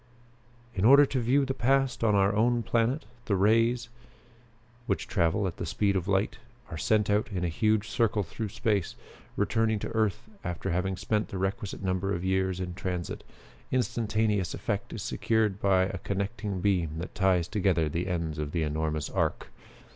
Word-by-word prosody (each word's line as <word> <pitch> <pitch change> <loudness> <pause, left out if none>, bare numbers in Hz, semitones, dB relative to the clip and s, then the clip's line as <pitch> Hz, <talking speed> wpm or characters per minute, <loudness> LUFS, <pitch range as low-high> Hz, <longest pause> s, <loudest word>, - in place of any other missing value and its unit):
"In 95 - -2
order 140 +5 +8
to 135 -1 -2
view 130 +4 +2
the 135 - -2
past 135 -1 +1
on 105 -2 +4
our 100 +1 +3
own 120 +2 +2
planet, 120 +7 0 0.2
the 100 - +1
rays, 115 +5 +3 1.0
which - - -1
travel 90 +1 +1
at 90 - -3
the - - -4
speed 100 -2 +1
of 95 -1 -1
light, 100 +1 0 0.3
are - - -4
sent 105 +3 +2
out 105 +4 +1
in 90 -3 -2
a - - +1
huge 110 +5 +1
circle 110 -2 +1
through 105 +5 -5
space, 105 -4 -1 0.4
returning 110 -1 +1
to - - -4
earth 110 0 -1 0.2
after 90 -1 -3
having 90 +2 -1
spent 105 +2 -1
the 95 - -6
requisite 95 +2 -3
number 95 +1 0
of 85 +1 -4
years 95 -1 0
in 90 -1 -4
transit. 90 -2 -4 0.5
Instantaneous 110 - 0
effect - - -3
is - - -5
secured 110 -3 0
by 95 -2 +4
a 95 0 -3
connecting 100 0 -3
beam 85 -6 +1
that 85 +3 -6
ties 95 -3 +2
together 90 -6 +1
the 85 +4 -2
ends 85 -4 -2
of 75 -1 -4
the 85 -2 +1
enormous 75 -1 -1
arc. - - -1
100 Hz, 175 wpm, -28 LUFS, 90-110 Hz, 1.0 s, order